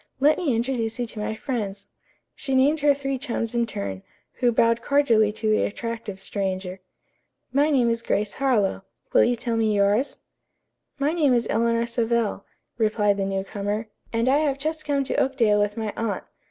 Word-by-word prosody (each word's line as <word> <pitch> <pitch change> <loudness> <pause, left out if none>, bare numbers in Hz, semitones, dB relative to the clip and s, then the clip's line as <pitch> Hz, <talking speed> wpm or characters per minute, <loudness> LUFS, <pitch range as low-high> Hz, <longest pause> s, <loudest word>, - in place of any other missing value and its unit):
Let 295 +3 +4
me 295 -10 +1
introduce 230 -1 -1
you 245 - -1
to 220 -1 -8
my 215 +1 -2
friends." 205 -6 -4 0.5
She 270 -1 -3
named 285 +4 +4
her 290 -1 +4
three 275 -1 -3
chums 230 -2 -3
in 235 -1 +1
turn, 100 - -5 0.4
who 245 -1 +3
bowed 230 0 +3
cordially 230 -7 +3
to 220 0 -3
the 215 0 +3
attractive 225 -2 -4
stranger. 190 -1 -3 0.7
"My 290 +3 +3
name 260 -5 +3
is 230 0 0
Grace 205 -2 -1
Harlowe. 220 -9 +2 0.3
Will - - +6
you 245 - +2
tell 235 -1 -2
me 220 -2 +2
yours?" 205 +6 +2 0.8
"My 290 +2 +1
name 295 -7 +3
is 235 -1 +1
Eleanor 230 0 +2
Savell," 235 -3 -1 0.3
replied 210 -2 +2
the 195 - 0
new 195 0 -1
comer, 205 +2 -3 0.2
"and 230 +1 0
I 270 +2 +4
have 290 -3 0
just 310 +2 -3
come 280 -2 +1
to - - -3
Oakdale 230 -6 +2
with 205 +1 -1
my 220 -2 -3
aunt. 225 -2 -2
230 Hz, 180 wpm, -24 LUFS, 210-265 Hz, 0.8 s, Will